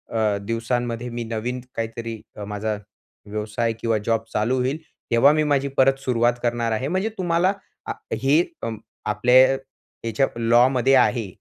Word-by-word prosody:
अ, 105 Hz, -2 st, +2 dB
दिवसांमध्ये 115 Hz, +1 st, -2 dB
मी 120 Hz, 0 st, -4 dB
नवीन 115 Hz, +3 st, -3 dB
काहीतरी 115 Hz, -1 st, -4 dB
अ, 105 Hz, -, -7 dB
माझा 105 Hz, +1 st, -3 dB, 0.5 s
व्यवसाय 110 Hz, +2 st, -2 dB
किंवा 115 Hz, -2 st, +1 dB
जॉब 115 Hz, -1 st, +1 dB
चालू 110 Hz, +5 st, +1 dB
होईल, 130 Hz, +4 st, 0 dB, 0.3 s
तेव्हा 120 Hz, +5 st, +6 dB
मी 155 Hz, 0 st, +2 dB
माझी 140 Hz, 0 st, +1 dB
परत 135 Hz, 0 st, +4 dB
सुरुवात 120 Hz, -1 st, +3 dB
करणार 120 Hz, -1 st, 0 dB
आहे. 120 Hz, +5 st, -1 dB
म्हणजे 190 Hz, +6 st, 0 dB
तुम्हाला 180 Hz, +1 st, +2 dB, 0.3 s
आ -, -, -1 dB, 0.3 s
हे 145 Hz, +5 st, +5 dB, 0.2 s
अ, 115 Hz, -, -1 dB, 0.4 s
आपल्या 120 Hz, +5 st, +2 dB, 0.7 s
याच्या 115 Hz, +5 st, +2 dB
लॉमध्ये 125 Hz, +3 st, +4 dB
आहे, 120 Hz, -4 st, +3 dB
120 Hz, 145 wpm, -23 LUFS, 115-130 Hz, 0.7 s, तेव्हा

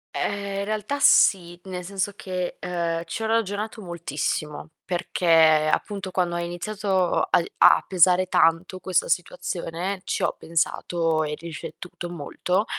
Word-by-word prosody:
Ehm, 200 Hz, -1 st, -2 dB
in 200 Hz, -, -2 dB
realtà 215 Hz, +6 st, -2 dB
sì, 175 Hz, -8 st, +4 dB
nel 180 Hz, -2 st, -6 dB
senso 195 Hz, +2 st, -2 dB
che, 180 Hz, -2 st, -4 dB
ehm, 170 Hz, -2 st, -2 dB
ci 220 Hz, +7 st, -5 dB
ho -, -, 0 dB
ragionato 220 Hz, 0 st, -1 dB
moltissimo 155 Hz, -3 st, -4 dB, 0.2 s
perché, 175 Hz, 0 st, -3 dB, 0.5 s
appunto, 195 Hz, -2 st, -2 dB
quando 175 Hz, -2 st, 0 dB
ha -, -, -1 dB
iniziato 190 Hz, +1 st, -1 dB
ai 170 Hz, -, +2 dB
a -, -, +6 dB
pesare 185 Hz, 0 st, +4 dB
tanto 170 Hz, +2 st, +2 dB
questa 185 Hz, -2 st, 0 dB
situazione, 180 Hz, +1 st, -3 dB
ci -, -, -2 dB
ho -, -, 0 dB
pensato 165 Hz, 0 st, 0 dB
e 150 Hz, 0 st, -3 dB
riflettuto 170 Hz, +2 st, -8 dB
molto, 180 Hz, +5 st, -1 dB
180 Hz, 135 wpm, -24 LUFS, 170-195 Hz, 0.5 s, a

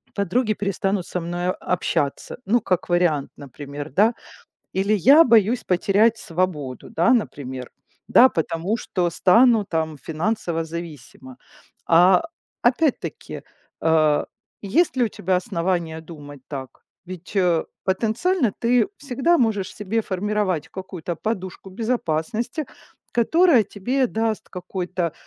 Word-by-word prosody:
подруги 215 Hz, +4 st, 0 dB
перестанут 195 Hz, -2 st, -2 dB
со 180 Hz, -, -3 dB
мною 175 Hz, +2 st, -2 dB
общаться. 145 Hz, -5 st, -1 dB
Ну 235 Hz, +4 st, +2 dB
как 180 Hz, -3 st, -1 dB
вариант, 175 Hz, -5 st, +1 dB
например, 145 Hz, +2 st, -8 dB
да? 210 Hz, -, +3 dB, 0.6 s
Или 195 Hz, +3 st, +1 dB
я 275 Hz, -, +7 dB
боюсь 230 Hz, -1 st, +3 dB
потерять 205 Hz, +5 st, +2 dB
свободу, 165 Hz, -9 st, -3 dB
да, 175 Hz, +9 st, +3 dB
например, 130 Hz, -, -3 dB, 0.4 s
да, 255 Hz, -, +7 dB
потому 165 Hz, +3 st, -2 dB
что 180 Hz, -5 st, -1 dB
стану 225 Hz, +5 st, +4 dB
там 160 Hz, -4 st, -2 dB
финансово 165 Hz, -, -2 dB
зависима. 150 Hz, -6 st, -9 dB, 0.5 s
А, 180 Hz, -, +5 dB, 0.4 s
опять-таки, 255 Hz, +4 st, -1 dB, 0.4 s
э, 155 Hz, -2 st, +3 dB, 0.4 s
есть 255 Hz, -, +1 dB
ли 250 Hz, -, +3 dB
у -, -, 0 dB
тебя 185 Hz, -3 st, -1 dB
основания 170 Hz, -4 st, -2 dB
думать 145 Hz, -4 st, -11 dB
так? 135 Hz, -3 st, -8 dB, 0.2 s
Ведь, 180 Hz, 0 st, -10 dB
э, 175 Hz, -4 st, +2 dB, 0.2 s
потенциально 230 Hz, -, +1 dB
ты 245 Hz, +7 st, +3 dB
всегда 285 Hz, +5 st, +1 dB
можешь 220 Hz, -, 0 dB
себе 210 Hz, +2 st, -2 dB
формировать 200 Hz, -4 st, -1 dB
какую-то 185 Hz, -3 st, -6 dB
подушку 190 Hz, -1 st, -5 dB
безопасности, 225 Hz, -, -2 dB, 0.5 s
которая 290 Hz, +2 st, +4 dB
тебе 250 Hz, +7 st, -1 dB
даст 225 Hz, -1 st, -2 dB
какой-то, 180 Hz, -2 st, -4 dB
185 Hz, 115 wpm, -22 LUFS, 165-225 Hz, 0.6 s, я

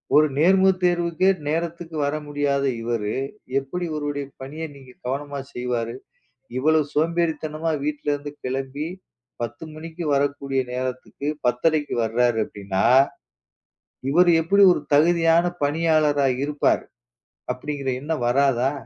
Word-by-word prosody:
ஒரு 155 Hz, +1 st, +7 dB
நேர்முகத் 190 Hz, +3 st, +4 dB
தேர்வுக்கே 175 Hz, 0 st, +2 dB, 0.2 s
நேரத்துக்கு 165 Hz, +1 st, -3 dB
வர 145 Hz, +1 st, -1 dB
முடியாத 145 Hz, -1 st, 0 dB, 0.2 s
இவரு 115 Hz, -3 st, -2 dB, 0.5 s
எப்படி 140 Hz, +7 st, -5 dB
இவருடைய 145 Hz, -2 st, -3 dB, 0.2 s
பணிய 145 Hz, +5 st, -6 dB
நீங்கக் 130 Hz, -2 st, -15 dB
கவனமா 140 Hz, +2 st, -3 dB
செய்வாரு? 120 Hz, -2 st, -2 dB, 0.6 s
இவ்வளோ 155 Hz, +4 st, +3 dB
சோம்பேறித்தனமா 160 Hz, 0 st, 0 dB
வீட்ல 150 Hz, 0 st, -3 dB
இருந்து 145 Hz, 0 st, -4 dB
கிளம்பி 135 Hz, +3 st, -3 dB, 0.5 s
10 120 Hz, +5 st, -5 dB
மணிக்கு 165 Hz, +2 st, -7 dB
வரக்கூடிய 140 Hz, -1 st, 0 dB
நேரத்துக்கு 130 Hz, +2 st, -4 dB, 0.2 s
10.30க்கு 145 Hz, +5 st, +1 dB
வர்றாரு 120 Hz, +1 st, +2 dB
அப்படின்னா, 100 Hz, -2 st, -3 dB, 1.3 s
இவரு 175 Hz, +4 st, +5 dB
எப்படி 200 Hz, +5 st, +4 dB
ஒரு 160 Hz, -, -2 dB
தகுதியான 165 Hz, +2 st, +4 dB, 0.2 s
பணியாளரா 150 Hz, -2 st, +2 dB, 0.2 s
இருப்பார் 145 Hz, 0 st, +1 dB, 0.7 s
அப்படிங்கிற 145 Hz, -2 st, -5 dB
எண்ணம் 150 Hz, -4 st, -2 dB
வராதா? 135 Hz, 0 st, +2 dB
145 Hz, 110 wpm, -23 LUFS, 130-160 Hz, 1.3 s, ஒரு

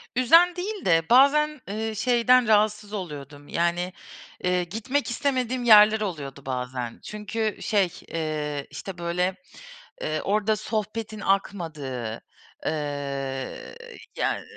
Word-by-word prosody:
Üzen 330 Hz, +8 st, +6 dB
değil 395 Hz, +3 st, -4 dB
de 165 Hz, -2 st, +5 dB
bazen, 295 Hz, +3 st, +5 dB
eee, 220 Hz, +2 st, -3 dB
şeyden 250 Hz, +1 st, +4 dB
rahatsız 210 Hz, -1 st, +2 dB
oluyordum, 145 Hz, -6 st, -7 dB
yani, 175 Hz, +2 st, 0 dB, 0.5 s
eee, 180 Hz, 0 st, +2 dB
gitmek 225 Hz, +11 st, -2 dB
istemediğim 255 Hz, -1 st, -1 dB
yerler 215 Hz, -1 st, +7 dB
oluyordu 145 Hz, -9 st, -5 dB
bazen. 125 Hz, -2 st, -4 dB
Çünkü, 210 Hz, +1 st, -3 dB
şey, 200 Hz, -4 st, +2 dB, 0.2 s
eee, 150 Hz, -3 st, -3 dB
işte, 175 Hz, +5 st, -7 dB
böyle, 180 Hz, +2 st, -1 dB, 0.7 s
eee, -, -, -1 dB
orada 210 Hz, +2 st, +1 dB
sohbetin 215 Hz, 0 st, -4 dB
akmadığı, 155 Hz, -, -2 dB, 0.5 s
ııı, 140 Hz, -3 st, -4 dB, 0.4 s
yani, -, -, 0 dB
200 Hz, 105 wpm, -25 LUFS, 150-225 Hz, 0.7 s, yerler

